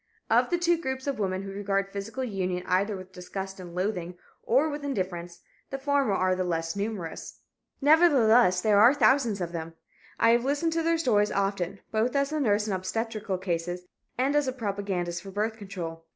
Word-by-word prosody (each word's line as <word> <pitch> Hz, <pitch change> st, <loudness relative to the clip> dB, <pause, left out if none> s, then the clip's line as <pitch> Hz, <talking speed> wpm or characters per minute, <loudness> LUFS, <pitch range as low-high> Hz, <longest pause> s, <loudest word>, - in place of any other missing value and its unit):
Of -, -, +4 dB
the 350 Hz, -, +1 dB
two 345 Hz, -1 st, +2 dB
groups 265 Hz, -3 st, -3 dB
of 280 Hz, -4 st, -2 dB
women 190 Hz, -1 st, -1 dB
who 195 Hz, -, -6 dB
regard 195 Hz, 0 st, -1 dB
physical 220 Hz, +6 st, -4 dB
union 185 Hz, -6 st, -2 dB
either 195 Hz, +3 st, +1 dB
with 185 Hz, 0 st, -11 dB
disgust 190 Hz, +1 st, -7 dB
and 175 Hz, -2 st, -9 dB
loathing, 180 Hz, -2 st, -2 dB, 0.2 s
or 270 Hz, +7 st, +3 dB
with 295 Hz, -1 st, -5 dB
indifference, 180 Hz, -9 st, -4 dB, 0.3 s
the 270 Hz, -, -3 dB
former 275 Hz, -5 st, +1 dB
are 185 Hz, -1 st, +2 dB
the 185 Hz, -, -1 dB
less 165 Hz, -1 st, -2 dB
numerous. 200 Hz, -5 st, -5 dB, 0.4 s
Nevertheless, 245 Hz, -, +5 dB
there 210 Hz, -1 st, +4 dB
are 225 Hz, +3 st, +9 dB
many 290 Hz, +2 st, -1 dB
thousands 235 Hz, -4 st, +3 dB
of 170 Hz, -1 st, -3 dB
them. 165 Hz, -1 st, -6 dB, 0.4 s
I 230 Hz, -, +5 dB
have 235 Hz, 0 st, +3 dB
listened 290 Hz, +5 st, 0 dB
to 330 Hz, -, +1 dB
their 330 Hz, +1 st, +2 dB
stories 210 Hz, -9 st, +2 dB
often, 195 Hz, -1 st, -1 dB
both 225 Hz, +4 st, 0 dB
as 280 Hz, +1 st, +1 dB
a 310 Hz, -, -1 dB
nurse 210 Hz, -6 st, +2 dB
in 210 Hz, -, -2 dB
obstetrical 215 Hz, +1 st, -2 dB
cases 175 Hz, -1 st, -3 dB, 0.3 s
and 270 Hz, +3 st, +1 dB
as 295 Hz, -2 st, +2 dB
a 260 Hz, -, -1 dB
propagandist 200 Hz, -7 st, -3 dB
for 195 Hz, -, -9 dB
birth 210 Hz, +3 st, -2 dB
control. 170 Hz, -5 st, -7 dB
205 Hz, 195 wpm, -27 LUFS, 185-260 Hz, 0.4 s, are